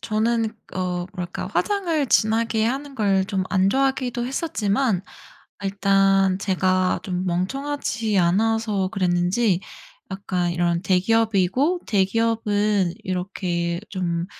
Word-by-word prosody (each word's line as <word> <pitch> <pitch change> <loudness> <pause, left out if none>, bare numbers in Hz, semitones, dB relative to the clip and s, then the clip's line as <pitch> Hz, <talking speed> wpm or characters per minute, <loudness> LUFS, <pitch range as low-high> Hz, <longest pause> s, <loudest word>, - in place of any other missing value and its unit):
저는 225 +1 0 0.2
어 180 -1 -2
뭐랄까 180 -1 -5
화장을 345 -8 0
진하게 220 0 +2
하는 275 +3 -3
걸 195 -4 +2
좀 190 -3 -1
안 190 0 +3
좋아하기도 260 -2 0
했었지만 220 - 0 0.6
일단 195 -1 +2
제가 185 -1 +1
좀 180 -1 -3
멍청하지 220 +3 -1
않아서 210 +2 +1
그랬는지 180 +2 +1 0.5
약간 180 -2 -2
이런 170 0 0
대기업이고 220 - +2
'대기업은 210 -2 +1
이렇게 180 -2 -2
좀 170 -3 -2
195 Hz, 245 characters per minute, -23 LUFS, 185-225 Hz, 0.6 s, 안